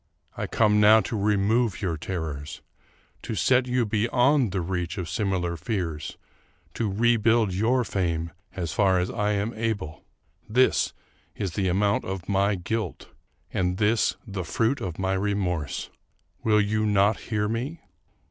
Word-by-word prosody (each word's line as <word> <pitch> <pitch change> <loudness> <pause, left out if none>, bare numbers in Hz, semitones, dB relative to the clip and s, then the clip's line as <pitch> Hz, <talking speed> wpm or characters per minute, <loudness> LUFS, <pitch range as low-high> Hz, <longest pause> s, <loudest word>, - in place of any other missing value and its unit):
I - - -3
come 105 -2 +3
now 110 +1 +7
to 110 - -4
remove 105 +2 +1
your 90 -6 -1
terrors; 80 -4 -5 0.6
to 110 - -4
set 125 +7 +3
you 125 -1 +1
beyond 120 +4 +2
the 95 - -1
reach 90 0 -3
of 90 -3 -3
similar 90 0 -1
fears; 85 -6 -4 0.6
to 110 -4 -1
rebuild 115 -1 +3
your 120 +7 +2
fame 85 -6 -2 0.2
as 85 -4 -3
far 95 -2 +3
as 90 +1 0
I 105 -2 0
am 105 +3 -1
able. 105 -9 -3 0.2
" - - -38
This 130 - +3 0.4
is 95 -3 -3
the 95 +2 -1
amount 100 +3 +2
of 95 -1 -5
my 100 +1 +2
guilt, 95 +1 -4 0.4
and 90 0 0
this 110 +2 +2
the 100 -4 -4
fruit 115 - 0
of 90 -6 -4
my 95 0 0
remorse. 95 -6 -2 0.5
Will 105 -1 +4
you 110 +1 0
not 105 +1 +3
hear 105 -2 -1
me? 125 +9 -3
100 Hz, 150 wpm, -26 LUFS, 90-110 Hz, 0.6 s, now